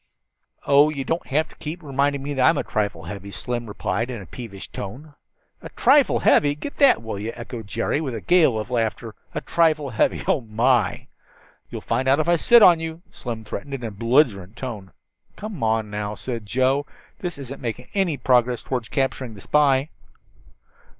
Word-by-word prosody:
"Oh, 145 +2 +5
you 140 -3 -3
don't 165 +6 -2
have 155 +3 +1
to - - -17
keep 160 +3 -6
reminding 140 0 0
me 145 +1 -3
that 130 -2 +1
I'm 165 - +2
a - - 0
trifle 100 -6 -2
heavy," 100 +3 -7
Slim 120 +3 -4
replied 115 +3 -2
in 120 -3 -5
a 100 - -9
peevish 100 -1 -9
tone. 130 +10 -8 0.5
"A - - -9
trifle 275 +2 +4
heavy! 145 -1 +4
Get 280 - -7
that, 275 - +5
will 110 -3 -5
you," 110 +3 -4
echoed 115 -2 -8
Jerry 115 +7 -1
with 135 -6 -3
a - - -3
gale 165 -10 +4
of 110 +3 -5
laughter. 115 -1 -2 0.2
"A - - -2
trifle 155 -4 +1
heavy! 110 - +1
Oh, 140 - +2
my!" 120 +3 +1 0.6
"You'll - - -6
find 125 +3 -1
out 135 +3 +4
if 155 - 0
I 175 - +4
sit 235 +6 +6
on 175 -4 +7
you," 165 +1 -6
Slim 115 -3 -6
threatened, 140 +6 -6
in 125 - -8
a 115 - -4
belligerent 110 -3 +1
tone. 110 -8 -6 0.4
"Come 210 -5 -7 0.3
now," 105 0 -3
said 115 -4 -6
Joe, 130 +5 +1 0.3
"this 175 -4 -4
isn't 135 -1 -8
making 115 -3 -5
any 190 -7 +1
progress 125 -1 +2
toward 125 -4 -3
capturing 130 -3 -2
the 100 - -11
spy." 145 +1 +2
130 Hz, 185 wpm, -23 LUFS, 115-150 Hz, 0.6 s, on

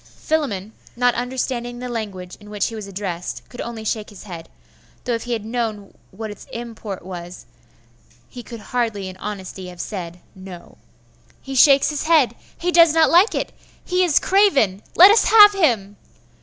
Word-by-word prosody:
Philammon, 225 -10 -3 0.2
not 245 0 +2
understanding 245 0 -3
the 250 +1 -6
language 200 -6 -6
in 210 -1 -14
which 210 -1 -1
he - - -10
was 215 -3 -7
addressed, 185 -3 -6
could 245 - -8
only 230 -2 -6
shake 215 -1 -3
his 205 - -13
head 170 -5 -9 0.5
though 245 - -2
if 230 0 -3
he 245 - -2
had 220 -2 -4
known 220 -3 -4 0.2
what 215 +2 -7
its 205 - -12
import 225 -6 -7
was, 175 -1 -9 0.8
he 245 - -10
could 235 -1 -10
hardly 225 -5 -2
in 185 - -10
honesty 190 -2 -7
have 180 -1 -11
said, 180 -4 -6
No. 185 -2 -12 0.6
'He 270 - -8
shakes 275 +2 +5
his 295 0 -3
head! 310 -8 +4 0.2
He 355 +1 -1
does 335 -2 +6
not 320 -1 +4
like 360 +6 +5
it! - - -2 0.3
He 365 0 +1
is 340 -5 +2
craven! 285 - +3
Let 375 +4 +9
us 445 - +4
have 415 -2 +8
him! 230 - 0
225 Hz, 175 wpm, -21 LUFS, 195-270 Hz, 0.8 s, Let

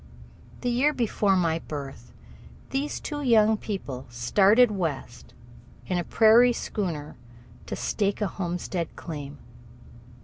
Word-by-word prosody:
The 245 - 0
year 275 +5 +2
before 210 -5 +1
my 165 -3 +1
birth 140 -4 -8 0.6
these 280 +2 -2
two 295 -1 -5
young 220 -4 +4
people 165 - -6
started 200 - +4
West 155 - -5 0.5
in 180 -1 -1
a - - -1
prairie 230 +6 +5
schooner 170 -11 -4 0.5
to - - -3
stake 200 -1 -1
a 210 - 0
homestead 180 -2 -4
claim. 145 -3 -7
195 Hz, 115 wpm, -26 LUFS, 160-225 Hz, 0.6 s, prairie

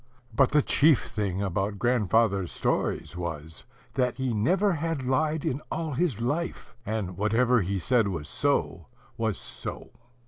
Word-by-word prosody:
But 135 -2 +4
the 150 -1 +3
chief 150 -1 +4
thing 100 -2 -2
about 100 +2 -1
grandfather's 110 -5 +2
stories - - -1
was, 80 -2 -6 0.3
that 125 0 0
he 130 -2 -1
never 185 - +2
had 160 -3 -2
lied 150 +4 +1
in 135 +3 -1
all 160 -1 -2
his 140 - 0
life; 145 +7 -3
and 105 -5 -3
whatever 115 +3 +3
he 95 +2 -1
said 115 +4 +2
was 80 -6 -4
so, 85 - -1 0.3
was 110 -3 -1
so. - - -7
115 Hz, 145 wpm, -27 LUFS, 95-140 Hz, 0.3 s, But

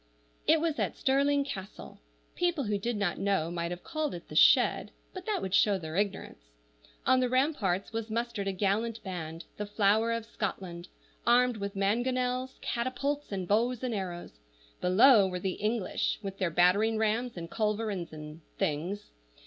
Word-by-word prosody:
IT 320 +1 +5
was 320 -2 -1
at - - -1
Stirling 280 +1 +2
Castle. 190 - -8 0.3
People 345 -5 0
who 205 -3 -1
did 235 +2 -2
not 200 -4 -1
know 195 -5 0
might 170 -1 -2
have 175 0 -6
called 310 - -2
it 170 - -10
the 155 - -8
shed, - - +5 0.2
but 370 +1 -8
that 425 -2 -1
would 190 -1 -3
show 200 -1 +4
their 160 -3 -7
ignorance. 200 - -2 0.6
On 260 - +5
the 250 -1 +1
ramparts 240 - 0
was 225 0 -3
mustered 230 -2 -2
a - - +1
gallant 210 +4 -1
band, 165 -3 -6
the 210 - -4
flower 210 +2 +2
of 230 -1 -2
Scotland, 185 -6 -5 0.4
armed 245 0 +4
with 200 0 -4
mangonels, 250 +5 0
catapults, 275 +4 -2
and 190 -3 -3
bows 235 +5 +1
and 250 -2 -1
arrows; 175 - -5 0.4
below 205 +3 +6
were 180 -1 -3
the 190 +1 -1
English, 215 -2 0
with 195 -1 -6
their 185 -3 +1
battering 185 +7 +3
rams 220 +1 0
and 170 0 -7
culverins 210 -5 -1
and 155 +1 -9 0.2
things. 175 +8 -2
210 Hz, 165 wpm, -30 LUFS, 185-245 Hz, 0.6 s, below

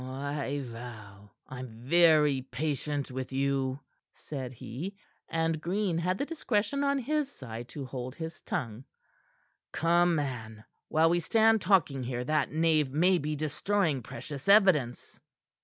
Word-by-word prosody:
"I 140 +2 -3
vow 110 -4 -10 0.2
I'm 130 0 -7 0.2
very 150 -2 +5
patient 145 +2 -3
with 130 0 -5
you," 135 0 0 0.3
said 130 -4 -6
he, 140 - -6 0.3
and 165 -1 0
Green 180 0 0
had 180 +2 0
the 280 - -1
discretion 280 -4 -1
on 280 0 +2
his 285 +2 -1
side 120 - -8
to 140 0 -6
hold 130 0 -6
his 160 -1 -7
tongue. 115 +2 -4 0.9
"Come, 170 +1 +3
man, 115 -7 -4 0.2
while 160 +1 +3
we 175 - +3
stand 220 +4 +3
talking 170 -8 +3
here 125 0 -3
that 155 +4 0
knave 155 -3 +2
may 175 +5 +3
be 150 0 -2
destroying 155 +1 0
precious 145 +6 -7
evidence." 185 - +4
150 Hz, 135 wpm, -30 LUFS, 130-175 Hz, 0.9 s, very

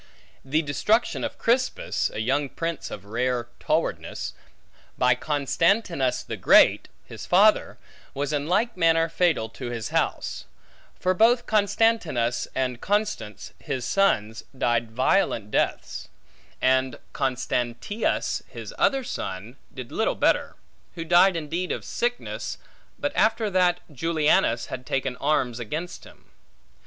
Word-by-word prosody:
The 155 +4 0
destruction 210 - +1
of - - -4
Crispus, 250 +2 0
a - - -9
young 135 +5 0
prince 165 +3 -4
of 100 - -8
rare 120 +2 -1
towardness, - - -2 0.6
by 125 0 +4
Constantinus 150 - 0
the - - -6
Great, - - +5 0.2
his - - -9
father, - - +4 0.4
was 145 +2 -2
in 145 0 -1
like 215 +7 +1
manner 165 -2 +3
fatal 165 -8 +1
to 120 +2 -7
his 115 -2 -4
house; - - -1 0.5
for 185 0 +2
both 235 +5 +4
Constantinus 205 - +1
and 125 -2 -1
Constance, 200 - -2
his 135 -5 -4
sons, 115 - +1
died 120 -2 +1
violent 115 - +1
deaths; - - -1 0.5
and 130 -1 +2 0.2
Constantius, 130 - -1
his - - -9
other 270 -1 +2
son, 100 - -5 0.2
did 130 -3 -9
little - - 0
better; - - +1 0.4
who 165 -1 -5
died 175 +2 +5
indeed 165 +3 -3
of - - -4
sickness, 245 +1 -3 0.4
but 285 0 -3
after 220 -1 +2
that 180 -1 +2
Julianus 150 -6 +2
had 130 -1 -7
taken 135 -1 -1
arms 130 -4 0
against 155 +10 -5
him. - - -18
145 Hz, 125 wpm, -25 LUFS, 125-185 Hz, 0.6 s, Great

